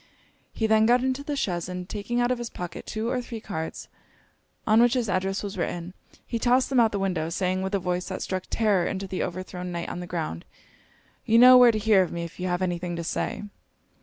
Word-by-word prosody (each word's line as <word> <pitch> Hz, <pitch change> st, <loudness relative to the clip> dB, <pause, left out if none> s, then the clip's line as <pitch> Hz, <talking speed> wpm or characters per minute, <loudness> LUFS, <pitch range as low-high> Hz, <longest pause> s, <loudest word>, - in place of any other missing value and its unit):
He 220 Hz, -, -2 dB
then 220 Hz, 0 st, +4 dB
got 245 Hz, +1 st, +4 dB
into 260 Hz, +1 st, -1 dB
the 290 Hz, 0 st, -3 dB
chaise; 175 Hz, -9 st, -2 dB
and 180 Hz, 0 st, -5 dB
taking 215 Hz, +4 st, -3 dB
out 245 Hz, +1 st, +2 dB
of 250 Hz, -, -1 dB
his 240 Hz, -1 st, -4 dB
pocket 180 Hz, -1 st, -7 dB
two 220 Hz, +1 st, -3 dB
or 250 Hz, +1 st, -1 dB
three 235 Hz, -2 st, -7 dB
cards, 160 Hz, -6 st, -6 dB, 0.8 s
on 220 Hz, +1 st, +5 dB
which 240 Hz, +1 st, +4 dB
his 245 Hz, -3 st, 0 dB
address 195 Hz, +1 st, -1 dB
was 200 Hz, -2 st, -5 dB
written, 175 Hz, +1 st, -3 dB, 0.3 s
he 230 Hz, -, -3 dB
tossed 250 Hz, +3 st, +2 dB
them 260 Hz, -, +4 dB
out 230 Hz, -, +6 dB
of 220 Hz, -, -11 dB
the -, -, 0 dB
window; 180 Hz, -5 st, -1 dB
saying, 185 Hz, +2 st, -1 dB
with 190 Hz, +1 st, -2 dB
a -, -, +1 dB
voice 180 Hz, 0 st, -2 dB
that 185 Hz, -, -4 dB
struck 185 Hz, -1 st, -3 dB
terror 205 Hz, -6 st, +2 dB
into 195 Hz, 0 st, -3 dB
the 185 Hz, -1 st, -4 dB
overthrown 180 Hz, 0 st, -5 dB
knight 170 Hz, -1 st, -4 dB
on -, -, -5 dB
the 175 Hz, -, -6 dB
ground 155 Hz, -, -4 dB, 0.8 s
'You 225 Hz, -, +3 dB
know 250 Hz, +2 st, +9 dB
where 250 Hz, -1 st, +8 dB
to 220 Hz, -, -2 dB
hear 215 Hz, -2 st, +4 dB
of 180 Hz, -, -1 dB
me 170 Hz, 0 st, -4 dB
if 170 Hz, +1 st, -9 dB
you 185 Hz, -, -2 dB
have 180 Hz, +1 st, -1 dB
any 175 Hz, -2 st, -1 dB
thing 175 Hz, 0 st, -4 dB
to 170 Hz, -, -4 dB
say.' 165 Hz, -, -3 dB
195 Hz, 245 wpm, -26 LUFS, 180-230 Hz, 0.8 s, know